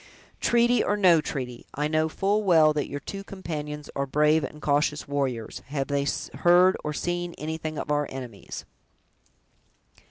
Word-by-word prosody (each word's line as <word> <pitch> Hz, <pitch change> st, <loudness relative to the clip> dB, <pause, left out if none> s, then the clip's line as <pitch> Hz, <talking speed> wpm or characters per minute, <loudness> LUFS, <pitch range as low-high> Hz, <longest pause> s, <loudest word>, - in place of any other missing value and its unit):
"Treaty 240 Hz, +1 st, +3 dB
or 205 Hz, -, +1 dB
no 175 Hz, -5 st, +5 dB
treaty, 125 Hz, -5 st, -5 dB
I 150 Hz, +1 st, 0 dB
know 155 Hz, +1 st, +1 dB
full 200 Hz, +5 st, 0 dB
well 160 Hz, -5 st, +5 dB
that 150 Hz, -1 st, -1 dB
your 145 Hz, -, -4 dB
two 195 Hz, 0 st, -6 dB
companions 150 Hz, -7 st, -6 dB
are 140 Hz, 0 st, -1 dB
brave 150 Hz, +3 st, +3 dB
and 150 Hz, +2 st, -6 dB
cautious 150 Hz, +1 st, +1 dB
warriors! 135 Hz, -6 st, -2 dB
have 135 Hz, 0 st, -3 dB
they 140 Hz, 0 st, 0 dB, 0.3 s
heard 180 Hz, +2 st, +6 dB
or 150 Hz, -, -2 dB
seen 175 Hz, +2 st, -3 dB
anything 155 Hz, 0 st, -4 dB
of -, -, -3 dB
our 145 Hz, 0 st, +1 dB
enemies?" 125 Hz, -6 st, -8 dB
150 Hz, 155 wpm, -26 LUFS, 145-175 Hz, 0.3 s, heard